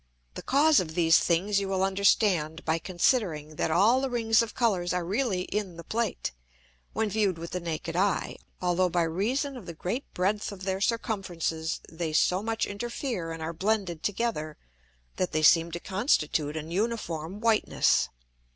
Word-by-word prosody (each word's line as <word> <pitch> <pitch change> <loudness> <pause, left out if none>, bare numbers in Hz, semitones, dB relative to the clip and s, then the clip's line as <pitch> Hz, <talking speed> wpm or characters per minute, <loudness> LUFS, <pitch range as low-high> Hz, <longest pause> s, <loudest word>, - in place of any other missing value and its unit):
The - - -7
Cause 295 +3 +4
of 160 -3 -4
these 165 -2 +5
things 195 +4 +1
you 200 - -3
will 190 -1 0
understand 190 -4 +2
by 160 +1 +1
considering, 170 - 0
that - - 0
all 210 +10 +4
the 270 - -1
Rings 225 -2 +3
of 230 -2 -4
Colours 190 -8 +1
are 180 -1 -1
really 200 0 0
in 195 -3 -4
the 170 - -8
Plate, 225 +4 -2 0.6
when 220 - 0
view'd 205 -3 0
with 170 +1 -7
the 180 - -2
naked 165 -1 -4
Eye, 195 +1 0 0.2
although 180 0 +1
by 175 0 +1
reason 235 - -1
of 225 -8 -10
the 170 - -7
great 220 - -4
breadth 205 +4 0
of 195 -2 -9
their 190 0 -2
Circumferences 180 -8 -2
they 160 -1 -4
so 180 +4 +3
much 225 +1 -1
interfere 210 - -4
and 165 -1 -6
are 165 +1 -3
blended 190 -2 -1
together, 205 -8 -2 0.6
that 185 - -1
they 155 - +1
seem 165 +2 +5
to 170 - -4
constitute 160 - 0
an 160 +1 -6
uniform 190 -4 -2
whiteness. 225 -1 +2
185 Hz, 170 wpm, -28 LUFS, 165-220 Hz, 0.6 s, these